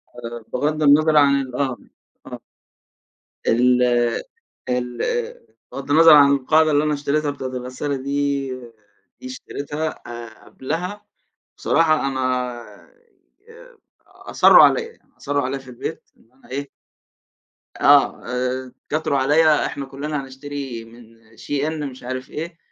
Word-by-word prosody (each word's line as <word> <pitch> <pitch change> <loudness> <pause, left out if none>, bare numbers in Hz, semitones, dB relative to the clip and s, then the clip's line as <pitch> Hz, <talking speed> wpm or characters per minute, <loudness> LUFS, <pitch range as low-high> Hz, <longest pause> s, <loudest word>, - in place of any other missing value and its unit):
آه 120 -1 -8
بغض 150 +1 -1
النظر 155 +2 +5
عنال 140 -3 +3
آه، 130 -3 -1 0.5
آه. - - -8 1.1
ال 125 +2 +3 0.9
ال 125 -1 -2 0.7
بغض 135 +1 -6
النظر 165 +1 +8
عن 140 -1 +7
القاعدة 155 +3 +3
اللي 145 +1 +3
أنا 150 -1 0
اشتريتها 145 +1 -1
بتاعة 135 -2 -6
الغسالة 130 +3 -4
دي، 140 0 -2 0.7
دي 255 - -9
اشتريتها 155 - -5 0.2
آآ، 120 -1 -10
قبلها 180 +9 -5 0.5
بصراحة 165 -1 +3
آآ، 150 - -1
أنا 125 - -4 1.2
أصرّوا - - +5
عليَّ 470 - +4
يعني 460 - -20
أصرّوا 145 0 -2
عليَّ 135 +2 -2
في 130 - -16
البيت 120 - -7
إن 115 - -28
أنا 135 - -23
إيه 140 +2 -5 1.1
آه، - - +4
آآ، 125 +1 -2 0.2
اتكاتروا 155 -2 -1
عليَّ 150 +3 +3
إحنا 140 - -5
كلنا 140 +2 -4
هنشتري 135 -3 -7
من 115 0 -17 0.2
SHEIN 150 +3 -3
مش 130 - -14
عارف 130 +1 -5
إيه 165 +2 -6
140 Hz, 125 wpm, -21 LUFS, 125-150 Hz, 1.2 s, النظر